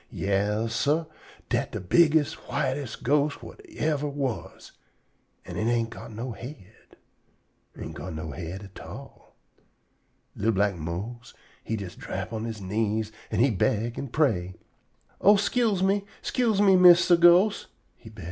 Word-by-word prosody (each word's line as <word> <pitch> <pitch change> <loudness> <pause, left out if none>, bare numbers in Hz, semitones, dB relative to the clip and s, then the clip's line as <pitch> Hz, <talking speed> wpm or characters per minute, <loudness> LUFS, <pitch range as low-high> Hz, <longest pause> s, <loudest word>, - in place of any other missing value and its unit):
Yas, 105 +3 -1
sah, 150 +7 +1 0.4
dat - - 0
de - - -3
bigges', 150 - +3 0.2
whites' 135 -3 -2
ghost 145 +2 +1
whut 415 - -12
yever 150 - -1
was. 140 -4 -5 0.7
An' - - -7
it 110 - -1
ain't 115 -1 0
got 115 - -9
no 120 +4 -5
head. 115 -4 -12 0.8
Ain't - - -7
go - - -7
no 80 0 -6
head 85 +6 -6
at 95 -1 -12
all. - - -12 1.0
Li'l 110 +3 +1
black 100 +1 +2
Mose 95 +9 -6 0.3
he 110 - -3
jest 100 -4 -8
drap 110 - -5
on 110 0 -3
he 105 -3 -9
knees 110 +2 -1 0.2
an' - - 0
he 130 +1 +4
beg 110 +3 0
an' 140 - -4
pray: 110 - 0 0.7
"Oh, 205 +2 +7
'scuse 205 -1 +1
me! 195 +1 +2 0.2
'Scuse 230 -5 +1
me, 195 -2 +6
Mistah 180 -1 +7
Ghost!" 175 +5 +5 0.3
he - - -14
beg. - - -15
120 Hz, 145 wpm, -26 LUFS, 105-160 Hz, 1.0 s, Oh